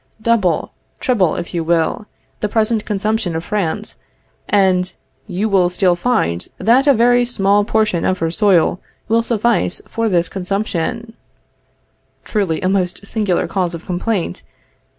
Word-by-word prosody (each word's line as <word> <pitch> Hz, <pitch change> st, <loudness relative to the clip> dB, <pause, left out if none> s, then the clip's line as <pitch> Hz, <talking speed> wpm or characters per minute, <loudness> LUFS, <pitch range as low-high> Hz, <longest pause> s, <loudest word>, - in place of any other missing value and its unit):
Double, 220 Hz, -6 st, +1 dB, 0.3 s
treble 210 Hz, -, +1 dB
if 170 Hz, -, -6 dB
you 170 Hz, -2 st, -1 dB
will, 165 Hz, +5 st, 0 dB, 0.3 s
the 210 Hz, -, -1 dB
present 220 Hz, 0 st, +1 dB
consumption 210 Hz, -3 st, -1 dB
of 165 Hz, -, -3 dB
France, 210 Hz, +1 st, -2 dB, 0.5 s
and 185 Hz, -2 st, +2 dB, 0.3 s
you 200 Hz, +2 st, -1 dB
will 190 Hz, -4 st, +3 dB
still 180 Hz, 0 st, +2 dB
find 170 Hz, -, 0 dB
that 255 Hz, +5 st, +3 dB
a 280 Hz, -, +7 dB
very 245 Hz, +2 st, +4 dB
small 205 Hz, -4 st, +2 dB
portion 210 Hz, -4 st, +1 dB
of 185 Hz, -, +1 dB
her 165 Hz, -2 st, -1 dB
soil 185 Hz, -2 st, +3 dB, 0.3 s
will 230 Hz, +1 st, +3 dB
suffice 230 Hz, -4 st, 0 dB
for 230 Hz, -1 st, -1 dB
this 175 Hz, -3 st, +2 dB
consumption. 200 Hz, +4 st, -3 dB, 1.1 s
(Truly 195 Hz, -7 st, -1 dB
a 185 Hz, -, 0 dB
most 190 Hz, 0 st, -1 dB
singular 205 Hz, -4 st, 0 dB
cause 180 Hz, -3 st, -1 dB
of 165 Hz, -, -10 dB
complaint!) 180 Hz, -, -2 dB
200 Hz, 140 wpm, -18 LUFS, 180-220 Hz, 1.1 s, a